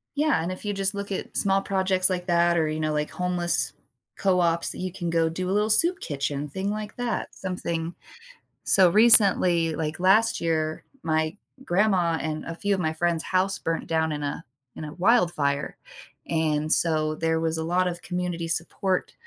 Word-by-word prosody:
Yeah, 295 - 0
and 175 - -4
if 185 - -6
you 205 - -3
just 195 0 +3
look 200 0 -6
at 190 - -6
small 195 0 +3
projects 190 -1 +1
like 180 0 -4
that 170 0 +2
or, 160 -1 +1
you 155 0 -4
know, 155 -1 -2
like 150 0 -2
homeless 180 -1 0 0.4
co-ops, 175 -3 0
you 185 -1 -5
can 175 -2 -5
go 165 -1 +1
do 180 +3 -4
a - - -1
little 210 +2 0
soup 345 +9 +6
kitchen, 145 0 -4
thing 190 +7 -4
like 210 0 -6
that, 245 -1 -4
something 170 -3 -5 0.7
so, 185 -2 +6
recently, 185 -6 +6
like, 155 -1 -4
last 195 +5 +2
year, 155 -1 -2 0.2
my 160 +1 -1 0.3
grandma 180 -4 +1
and 155 -1 -5
a 165 - -7
few 200 +4 -2
of - - -3
my 160 -2 -1
friends' 170 0 -1
house 190 +1 -1
burnt 165 0 -4
down 160 -1 -1
in 150 -1 -5
a 145 +3 -5 0.3
in 155 - -7
a 150 - -8
wildfire, 170 -9 0 0.5
and 155 -2 0
so 155 -2 +1
there 160 0 -1
was 160 0 -1
a 160 - -3
lot 180 +2 0
of 175 0 -5
community 180 -2 -4
support 180 +3 -1
175 Hz, 185 wpm, -24 LUFS, 160-190 Hz, 0.7 s, soup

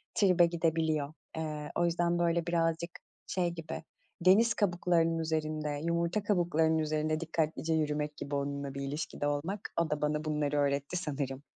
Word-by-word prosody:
tribe 180 -4 +5
gidebiliyor. 160 -3 0 0.2
Eee, 150 -2 -4
o 175 - +2
yüzden 170 0 +1
böyle 170 0 +2
birazcık 165 0 0 0.4
şey 180 -2 0
gibi, 165 -1 -6 0.4
deniz 215 +6 +6
kabuklarının 175 -4 +2
üzerinde, 155 -2 -1
yumurta 170 +4 0
kabuklarının 165 -5 +2
üzerinde 155 0 0
dikkatlice 160 0 -1
yürümek 150 -1 0
gibi 140 0 -4
onunla 140 0 -2
bir 140 - -5
ilişkide 145 +1 -3
olmak. 165 +8 -2
O 165 - 0
da 150 0 -1
bana 150 +1 0
bunları 150 -1 0
öğretti 140 +4 0
sanırım. 140 -4 -3
160 Hz, 145 wpm, -31 LUFS, 150-170 Hz, 0.4 s, deniz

